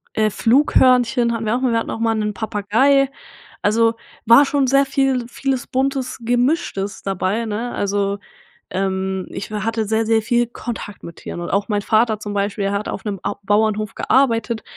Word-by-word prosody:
Äh, 215 -1 +2
Flughörnchen 245 0 +3
hatten 225 -1 -3
wir 215 +3 +1
auch 255 - -2
mal. 255 -3 +1
Wir 230 - +2
hatten - - -5
auch - - -5
mal 225 -1 +1
'nen 210 -1 -1
Papagei. 230 +6 +2 0.5
Also 225 +2 +3 0.3
war 235 +5 +7
schon 275 -2 +1
sehr 275 +1 +4
viel 270 -3 0
vieles 265 0 -2
Buntes, 265 0 -1
Gemischtes 245 - -1
dabei, 195 +4 -1
ne? 225 +3 -3
Also, 200 0 -1 0.5
ähm, 190 0 -2
ich 195 +2 -7
w 215 - -3
hatte 225 0 -1
sehr, 220 +1 0
sehr 225 0 +2
viel 240 +2 +1
Kontakt 235 -4 -7
mit 170 - -10
Tieren - - -7
und 175 - -5
auch 200 +2 0
mein 205 -1 0
Vater 220 -1 +2
zum 205 -1 -6
Beispiel, 200 0 -1
der 195 - 0
hat 200 +1 -2
auf 195 - -6
'nem 200 -3 -3
Au 205 - -2
Bauernhof 215 +1 +1
gearbeitet. 230 -4 +1
225 Hz, 185 wpm, -20 LUFS, 205-245 Hz, 0.5 s, war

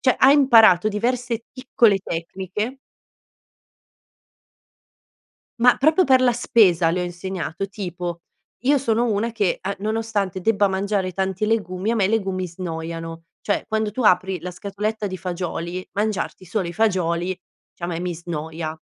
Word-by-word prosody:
cioè, 255 - +3
ha 265 - +7
imparato 225 - +6
diverse 235 +2 -2
piccole 240 -5 +2
tecniche 190 +8 -4 2.8
Ma 245 +1 +6
proprio 315 +6 +4
per 260 -3 +4
la 250 -1 +4
spesa 185 -8 +3
le 180 +1 -1
ho - - -1
insegnato, 175 0 -4
tipo 180 -3 -5 0.4
io 285 +3 +4
sono 235 -3 +1
una 225 0 0
che 210 -5 0
a 195 +1 -3
nonostante 215 -3 -2
debba 205 0 +3
mangiare 195 0 -1
tanti 190 +2 -1
legumi 205 -3 -1
a - - 0
me 205 -4 +2
i - - +2
legumi 190 -4 -1
snoiano. 165 -1 -6 0.2
Cioè, 205 - -1
quando 220 -1 -1
tu 250 +4 -3
apri 190 -2 +3
la 180 +3 -6
scatoletta 205 +3 -3
di 185 -1 -5
fagioli, 180 0 -4
mangiarti 205 -2 -2
solo 185 0 -2
i 170 - -6
fagioli 180 -3 0 0.3
diciamo 175 0 -5
e - - -3
mi 180 0 -3
snoia. 160 -1 -5
195 Hz, 145 wpm, -22 LUFS, 175-225 Hz, 2.8 s, ha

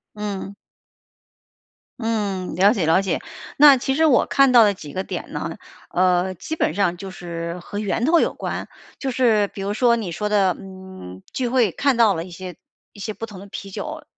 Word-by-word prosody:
嗯。 200 -1 -5 1.4
嗯， 205 -6 -2
了 200 +4 +5
解 195 -9 -1
了 165 +4 +4
解。 195 - -2 0.4
那 285 -1 +8
其 270 +1 -1
实 320 +2 +3
我 275 -5 +4
看 275 -1 +4
到 240 -2 +8
的 205 - +3
几 150 -6 -10
个 185 - -3
点 - - -6
呢， - - -4 0.4
呃， 180 +1 +2
基 315 - -6
本 155 - 0
上 180 -3 +1
就 195 +1 -7
是 170 -2 -6
和 205 +4 -6
源 210 +2 -1
头 325 +6 +4
有 - - +1
关。 - - -5 0.3
就 270 -2 -2
是 225 -5 +3
比 195 - -9
如 200 +1 -2
说 235 +2 +3
你 210 -7 -4
说 210 +5 -2
的， 200 -3 +3
嗯， 185 - -11
聚 255 - -1
会 240 -5 +2
看 275 - +1
到 230 -3 +5
了 165 -1 -4
一 180 - -12
些 180 -1 -8 0.4
一 205 - -16
些 215 +2 -4
不 225 - -6
同 210 -4 -11
的 200 - -11
啤 195 0 -8
酒， 310 +9 -6
200 Hz, 215 characters per minute, -22 LUFS, 185-235 Hz, 1.4 s, 那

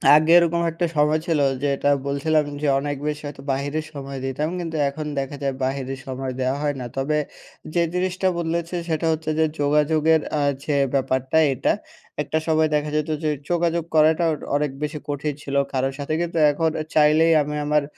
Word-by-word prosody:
আগে 155 +2 +4
এরকম 170 0 +3
একটা 170 +2 -1
সময় 150 +1 +3
ছিল, 160 -3 +2 0.2
যেটা 140 0 +1 0.2
বলছিলাম 150 +2 +1 0.2
যে, 150 - 0
অনেক 145 0 -3
বেশি 150 0 -2
হয়তো 135 -1 -9
বাহিরের 145 +3 -2
সময় 135 -1 -6
দিতাম, 145 +4 -2
কিন্তু 165 -2 -4
এখন 150 +2 -6
দেখা 135 +1 -4
যায়, 135 -1 -1
বাহিরের 135 0 -3
সময় 130 0 -4
দেওয়া 130 +2 0
হয় 145 -1 0
না। 125 - -5
তবে 150 +3 0 0.6
যে 170 - +2
জিনিসটা 185 +1 0
বদলেছে, 170 +1 -2
সেটা 160 +1 0
হচ্ছে 160 0 -2
যে, 160 - +5 0.2
যোগাযোগের 150 +2 +3 0.2
আ - - +1 0.2
যে 150 - 0 0.2
ব্যাপারটা 130 +2 +1 0.2
এটা, - - +1 0.5
একটা 155 - -1
সময় 155 -1 +3
দেখা 150 0 0
যেত 155 +1 0
যে, 155 - +1 0.2
যোগাযোগ 170 -1 +1
করাটা 160 +2 +4 0.3
অনেক 145 -1 0
বেশি 150 0 -3
কঠিন 145 +1 -2
ছিলো, 140 0 0
কারোর 135 +1 0
সাথে 145 +2 -3
কিন্তু 170 -1 -2
এখন 160 +2 +1 0.3
চাইলেই 155 +2 +5
আমি 150 +1 -3
আমার 150 -1 +2
150 Hz, 175 wpm, -23 LUFS, 140-160 Hz, 0.6 s, যে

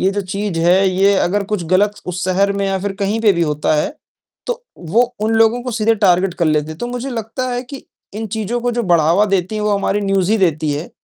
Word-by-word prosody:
ये 190 - +2
जो 205 +1 -2
चीज़ 195 -1 -3
है 180 +3 +4
ये 195 +2 +3
अगर 200 +3 +1
कुछ 200 -3 -3
गलत 195 +4 +2
उस 180 0 -3
शहर 195 +2 +1
में 200 0 -1
या 195 0 0
फिर 200 +1 -3
कहीं 205 +3 0
पे 215 -3 +4
भी 170 -2 0
होता 150 -1 0
है, 150 - -1 0.5
तो - - -4
वो 185 +9 +2 0.2
उन 220 +1 0
लोगों 225 +2 +3
को 250 - -4
सीधे 225 0 +1
टारगेट 190 -3 +2
कर 170 - -1
लेते 155 0 +1
हैं, 155 - -8
तो 240 - -3
मुझे 245 +2 -5
लगता 235 +2 -4
है 245 - -2
कि, 265 +2 -10 0.3
इन 220 +1 -4
चीज़ों 220 +3 -3
को 245 +1 0
जो 240 0 -1
बढ़ावा 170 0 +3
देती 195 0 -1
हैं 215 - -2
वो 210 - +1
हमारी 200 +1 0
न्यूज़ 195 -2 0
ही 220 - +4
देती 155 -5 +1
है। 150 +4 -5
200 Hz, 250 wpm, -17 LUFS, 180-225 Hz, 0.5 s, है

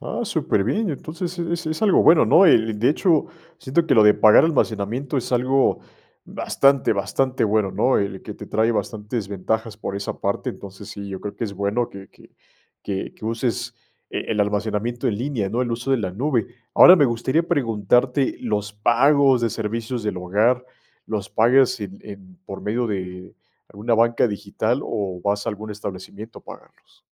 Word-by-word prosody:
Ah, - - -5
superbién. 175 - 0
Entonces, 170 +5 -6
es 170 0 -3
es 155 +6 -3
algo 205 -4 +4
bueno, 165 - +6
¿no?, 195 - +6
eh, 150 - +7 0.2
de 115 +4 +1
hecho, 160 -1 +2 0.3
siento 165 +2 0
que - - +3
lo 110 - +6
de 105 0 +6
pagar 110 +6 +6
almacenamiento 130 -2 -1
es 130 - -3
algo 130 +2 +2 0.5
bastante, 140 -3 +1
bastante 120 +7 -1
bueno, 105 -2 +1
¿no?, 120 +7 +1
el 100 -2 -3
que - - -8
te - - -10
trae 110 +2 +1
bastantes 110 -1 -4
ventajas 110 +3 -3
por 105 - -5
esa 100 - -5
parte. - - -2
Entonces, 100 0 -11
sí, 100 -1 -8
yo 95 -1 -6
creo 105 - -7
que - - -3
es 100 -3 -6
bueno, 100 +5 -1
que 100 -1 -12
que - - -21 0.5
que 95 -2 -5
que - - -13
uses 120 +1 -2 0.4
e - - -3
el 105 -2 0
almacenamiento 105 +3 -1
en 105 -1 -2
línea, 120 -7 -2
¿no?, 120 +4 -1
el 120 - -3
uso 120 +3 -3
de 135 - +4
la 95 -4 -3
nube. 120 0 -1 0.3
Ahora 180 - +9
me 150 - +4
gustaría 130 +7 0
preguntarte, 125 - +1
¿los 105 -3 -2
pagos 130 +4 +3
de 115 - 0
servicios 115 +3 -4
del 105 -3 -2
hogar, 105 +8 +1 0.4
los 100 -3 -4
pagas 120 +1 +3
en 100 -1 -7
en 95 -3 -12
por 95 0 -8
medio 115 +3 -1
de 95 -3 -6 0.3
alguna 105 +3 -1
banca 115 +2 +3
digital 100 -2 -2
o 95 -3 -4
vas 100 0 -1
a - - +1
algún 110 0 -8
establecimiento 100 +2 -8
a - - -32
pagarlos? - - -16
115 Hz, 180 wpm, -22 LUFS, 100-130 Hz, 0.5 s, Ahora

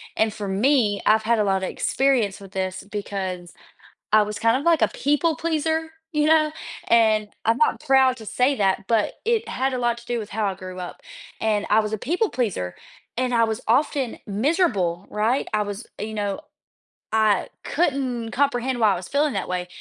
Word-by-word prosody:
and 220 -1 +1
for 205 -2 -5
me, 210 +1 +2
I've 220 0 +4
had 230 0 +2
a - - +3
lotta 190 -2 0
experience 250 -8 +1
with 195 -1 -12
this, 190 -1 -3
because 190 -4 -4 0.6
I 215 - +7
was 210 0 -5
kind 230 +2 +3
of 280 - -5
like 335 -2 +3
a - - +5
people 295 +3 +1
pleaser, 320 0 -1 0.2
you 300 0 +2
know, 310 -1 +4 0.4
and 220 -2 +4 0.2
I'm 225 +1 +3
not 305 - +2
proud 265 -1 +4
to 220 - -10
say 255 +6 +1
that, 195 -4 +1
but 220 -1 +1
it 460 -1 +1
had 265 +1 -1
a 255 - -1
lot 240 -1 0
to 235 - -16
do 240 0 -2
with 215 -1 -7
how 215 0 -1
I 195 - 0
grew 185 -1 -8
up, 180 -1 -7 0.4
and 210 -2 +1
I 215 - +5
was 215 0 -4
a - - 0
people 350 - 0
pleaser, 130 - -2 0.4
and 250 0 0
I 230 - +4
was 220 -1 -1
often 265 +1 +1
miserable, 205 - 0
right, 220 +6 0
I 215 - +2
was 205 +2 -6
you 215 +1 -4
know, 205 -2 -2 0.7
I 215 -3 +2 0.2
couldn't 260 -7 -1
comprehend 260 -1 0
why 215 -3 +4
I - - -1
was 180 0 -7
feeling 290 +1 +1
that 195 - -3
way, 180 0 -2
225 Hz, 195 wpm, -23 LUFS, 205-270 Hz, 0.7 s, I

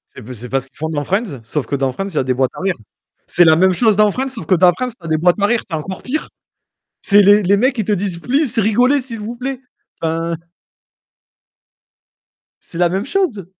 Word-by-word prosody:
c'est - - -10
b 120 +4 -10
c'est 120 +1 -8
pas 135 0 0
ce 135 - -13
qu'ils - - -26
font 160 +1 -3
dans 145 -2 -2
Friends, 190 - -2
sauf 135 +5 -3
que - - -2
dans 135 -1 0
Friends 195 +9 -4
il 180 - -9
y - - -2
a - - +2
des 130 0 0
boîtes 130 0 0
à - - -8
rire. 190 -1 0 0.5
C'est 175 - +4
la 160 -1 +6
même 185 +2 +4
chose 215 +2 +2
dans 210 -1 +4
Friends 265 +5 -2
sauf 250 -4 -5
que 190 - +3
dans 175 0 +5
Friends, 250 +8 -3
tu - - -7
as - - -6
des 155 - +2
boîtes 180 +4 +2
à 200 - +4
rire, 235 +1 +1
c'est 165 - -5
encore 185 +5 -6
pire. 295 +5 -3 0.7
C'est 205 0 +5
les 205 +1 +5
les 200 +2 +3
mecs 250 +3 +1
ils 215 - 0
te 210 - -1
disent: 190 -3 -1
«Please, 255 - 0
rigolez 245 +7 +3
s'il 235 -4 -7
vous 230 +3 -6
plaît», 260 +1 -5 0.4
enfin 165 +1 -1 2.3
c'est 170 - -9
la 175 -1 +3
même 190 +5 -2
chose. 275 - -1
195 Hz, 245 wpm, -17 LUFS, 160-230 Hz, 2.3 s, la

